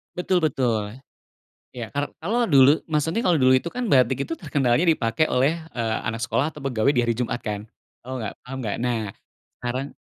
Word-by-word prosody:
Betul 180 -1 +1
betul. 120 -6 0 0.7
Ya, 120 -3 -6
ka 145 +3 -3
kalau 230 +8 +1
dulu 140 - +5
maksudnya 160 +8 0
kalau 170 -5 +3
dulu 130 0 +6
itu 170 +6 -2
kan 245 -2 -3
batik 130 -1 +3
itu 165 - -3
terkenalnya 145 -2 +1
dipakai 155 -3 +2
oleh, 135 +6 +3 0.2
eee, 115 -2 -1
anak 115 0 -3
sekolah 135 +6 0
atau 150 - -11
pegawai 135 0 +1
di 125 - +2
hari 120 -1 0
Jumat 120 -1 -2
kan? 105 -1 -4 0.4
Tahu 130 0 -5
nggak, 110 - -4
paham 130 +1 -6
nggak? 105 -4 -2
Nah, 115 -3 -1 0.6
karang 130 +3 -3
130 Hz, 185 wpm, -24 LUFS, 120-155 Hz, 0.7 s, dulu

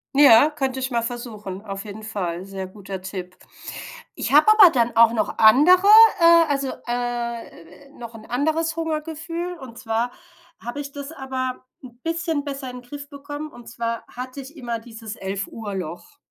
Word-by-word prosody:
Ja, 285 0 +7
könnte 265 -3 -2
ich 260 0 -3
mal 235 -1 +1
versuchen, 220 -5 -6
auf 195 0 -6
jeden 215 +1 -9
Fall, 185 -5 -4
sehr 195 -1 -6
guter 195 -1 -8
Tipp. 185 -1 -7 0.8
Ich - - -4
habe 295 +2 +6
aber 425 -4 +9
dann 240 -6 0
auch 230 0 +7
noch 225 -2 -2
andere, 315 - +6 0.3
äh, 335 -1 +6
also, 275 -2 -1
äh, 240 -2 -5
noch 235 -1 -9
'n 220 -1 -12
anderes 315 +6 0
Hungergefühl 325 +2 -4
und 245 -4 -11
zwar 230 0 -1 0.5
habe 240 +5 -5
ich 280 - -8
das 285 +1 -8
aber 260 -3 -4 0.2
'n 245 -2 -13
bisschen 330 -3 -1
besser 275 -2 -5
in 250 0 -9
Griff 285 +3 -9
bekommen 290 +1 -7
und 240 -1 -14
zwar 230 0 -4
hatte 255 +2 -8
ich 275 +3 -10
immer 240 -5 -4
dieses 225 -1 -9
11- 195 -1 -4
Uhr-Loch. 200 - -7
245 Hz, 165 wpm, -23 LUFS, 220-290 Hz, 0.8 s, aber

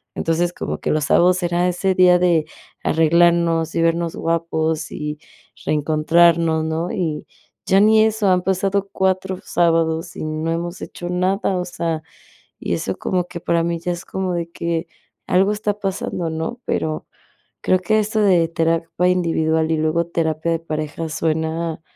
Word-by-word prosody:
Entonces, 170 +2 0
como - - -4
que - - -3
los 155 -1 +1
sábados 180 +4 +3
era 175 +1 +1
ese 185 +2 0
día 180 -1 +6
de 170 -3 +3 0.4
arreglarnos, 165 0 +3
y 165 - +1
vernos 165 0 0
guapos 165 -1 -1
y 150 0 -5 0.5
reencontrarnos, 160 +2 +3
¿no?, 160 +2 -2
y 160 -5 -3 0.4
ya 190 - +4
ni 215 +1 +5
eso, 220 -1 +1
han 180 -1 +3
pasado 195 +1 0
4 190 -1 0
sábados 165 0 +1
y - - -5
no 155 +1 -2
hemos 170 +2 -4
hecho 175 - -7
nada, 185 +2 0
o 180 - -2
sea, 170 -3 -3 0.6
y 85 - -2
eso 95 +3 -3
como 180 -1 -1
que 180 -1 -8
para 170 0 +1
mí 170 0 -1
ya 175 +1 -2
es 175 0 -6
como 190 -1 -3
de 170 -1 -3
que 170 -1 -3 0.4
algo 195 +3 +3
está 210 -1 -2
pasando, 190 -3 -3
¿no?, 160 +10 -4
pero 155 -1 -2 0.6
creo 185 - +2
que 215 +4 +1
esto 215 +1 -1
de 180 -5 +4
terapia 165 +1 0
individual 160 -3 +1
y 160 - +1
luego 155 +2 0
terapia 160 -1 -1
de 165 - -1
pareja 155 0 -4
suena 160 +1 -2
170 Hz, 160 wpm, -20 LUFS, 160-180 Hz, 0.6 s, día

